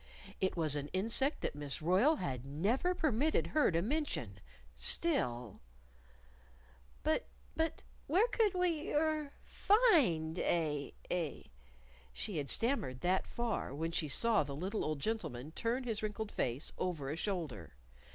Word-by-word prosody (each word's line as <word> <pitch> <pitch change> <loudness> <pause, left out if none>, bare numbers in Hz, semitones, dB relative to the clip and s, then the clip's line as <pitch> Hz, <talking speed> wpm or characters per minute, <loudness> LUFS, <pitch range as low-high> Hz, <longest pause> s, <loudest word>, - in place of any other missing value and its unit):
It 190 -1 0
was 155 -3 +4
an 145 -1 -3
insect 230 +9 +1
that - - -2
Miss 145 -1 -4
Royle 185 - +4
had 130 - -3
never 205 - 0
permitted 305 -1 +1
her 305 -1 +3
to 165 0 +1
mention. 295 +7 -2 0.4
Still 125 - 0 1.4
"But 315 +11 +1 0.3
but 320 0 -1 0.2
where 380 +10 +4
could 440 -5 +2
we 340 -4 0
er 305 -1 +1
find 265 - +3
a 150 -4 0 0.2
a 170 -5 -3 0.3
?" - - -26
She 195 - -2
had 140 -2 -2
stammered 185 - 0
that 185 +2 +1
far 235 - -2
when 165 +3 -2
she 165 -2 0
saw 220 +9 +4
the 140 -2 -4
little 190 +8 -2
old 155 -1 -2
gentleman 155 - -3
turn 235 +8 -1
his 225 -4 -2
wrinkled 215 0 -3
face 125 +5 -1
over 155 -7 -2
a - - -2
shoulder. 150 - -4
185 Hz, 140 wpm, -35 LUFS, -, 1.4 s, was